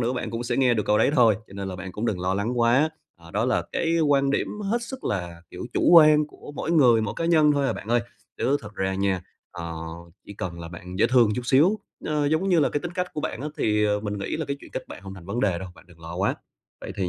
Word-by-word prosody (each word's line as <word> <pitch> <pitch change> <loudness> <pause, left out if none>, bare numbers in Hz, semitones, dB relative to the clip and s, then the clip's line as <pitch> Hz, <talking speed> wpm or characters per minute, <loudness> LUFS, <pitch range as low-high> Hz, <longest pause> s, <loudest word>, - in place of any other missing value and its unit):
nữa, 120 +1 0
bạn 120 -3 -3
cũng 115 +1 -3
sẽ 120 0 -2
nghe 130 -3 +4
được 105 - 0
câu 105 - +3
đấy - - +4
thôi, 115 -5 +5
cho - - -17
nên 100 -1 -4
là 90 - -5
bạn 95 -1 -7
cũng 110 +3 -3
đừng 95 -5 -1
lo 95 +1 0
lắng 115 +5 -1
quá, 125 +7 +4 0.3
ờ, 85 -1 -15
đó - - 0
là - - +1
cái 165 0 +1
quan 140 -3 +3
điểm 140 - 0 0.2
hết 235 +2 0
sức 260 +2 -8
là, 85 -4 -3
kiểu, - - -7
chủ - - +2
quan 155 -2 +7
của 145 - -12
mỗi - - -3
người, 125 -8 +5
mỗi 105 - -3
cá 165 - -2
nhân 155 -3 +4
thôi 140 -1 +1
à - - +1
bạn - - -8
ơi. 120 +1 +3 0.4
Chứ 140 +2 +2
thật 105 0 -10
ra 95 0 -1
nha, 95 -1 0 0.3
ờ, 85 0 -6 0.5
chỉ - - -8
cần 85 -3 -5
là 85 - -7
bạn 90 +2 -9
dễ - - +5
thương 120 -4 +5
chút 125 - -3
xíu, 155 - +4 0.3
ờ, 150 -1 0
giống 155 +6 +1
như 175 -3 +4
là 145 - +3
cái 145 - -2
tính 175 - -5
cách 180 -1 -1
của 150 - -2
bạn - - -4
á, 150 - -3
thì, 105 0 +2
ờ, 105 0 +1
mình 105 -1 -4
nghĩ 100 - -3
là 160 - -3
cái 140 -1 -3
chuyện - - -13
kết - - -5
bạn - - -10
hông 95 -1 -8
thành 90 -2 -12
vấn 115 +5 -2
đề 90 -5 +1
đâu, 95 0 -7
bạn - - -17
đừng 85 -2 -19
lo 85 +1 -8
quá. 95 +2 +1 0.5
Vậy - - -7
thì 95 -2 -1
115 Hz, 290 wpm, -25 LUFS, 95-145 Hz, 0.5 s, quan